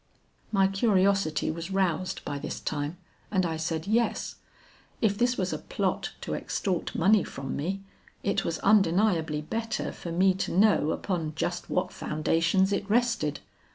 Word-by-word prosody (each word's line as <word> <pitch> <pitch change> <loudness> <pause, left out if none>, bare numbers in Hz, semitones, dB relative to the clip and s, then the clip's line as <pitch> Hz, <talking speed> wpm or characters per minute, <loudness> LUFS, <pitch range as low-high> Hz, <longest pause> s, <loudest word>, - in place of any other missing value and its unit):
"My 195 -2 +4
curiosity 195 -5 +2
was 165 +3 -6
roused 185 -2 -1
by 145 - -3
this - - -5
time 150 +2 -3 0.3
and 190 -3 +1
I 165 -1 -1
said 160 0 -2
yes. 225 +3 0 0.6
If 210 -3 +2
this 245 +3 +1
was 185 -1 -1
a - - -3
plot - - -2
to - - -4
extort 185 -5 -2
money 195 +2 +4
from 135 0 -5
me, 190 +7 -3 0.4
it - - +1
was - - -2
undeniably 175 -6 +3
better 225 +8 -3
for 170 - -7
me 185 +3 +4
to 190 - -3
know 200 -7 +4
upon 165 -3 -2
just 175 +2 -2
what 180 - -1
foundations 165 +5 +1
it 200 0 -2
rested. 220 - +1
185 Hz, 155 wpm, -28 LUFS, 160-200 Hz, 0.6 s, My